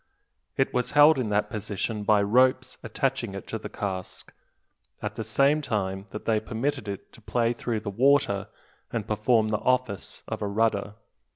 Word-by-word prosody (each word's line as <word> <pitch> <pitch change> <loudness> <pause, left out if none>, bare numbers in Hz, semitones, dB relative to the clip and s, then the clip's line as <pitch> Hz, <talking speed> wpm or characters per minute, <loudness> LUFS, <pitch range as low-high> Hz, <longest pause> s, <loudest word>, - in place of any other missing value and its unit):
It 135 - +1
was 125 +1 -1
held 150 0 +7
in 120 -4 -1
that 105 0 0
position 105 +1 -3
by 105 0 +4
ropes 130 +4 +2
attaching 115 -2 -2
it 100 - -7
to - - -3
the - - -7
cask, 95 -2 -5 0.7
at 105 0 -4
the 110 - -4
same 140 +8 +3
time 95 -6 -2
that 105 - -8
they 110 -2 +2
permitted 115 +2 -3
it 100 -1 -7
to - - -16
play 115 +2 0
through 115 -2 -3
the 105 -2 -4
water, 125 -3 +3 0.4
and 115 -3 -3
perform 110 +1 +2
the 105 -1 0
office 125 -7 -1
of - - -4
a 105 - -1
rudder. 105 -1 0
110 Hz, 175 wpm, -26 LUFS, 105-125 Hz, 0.7 s, held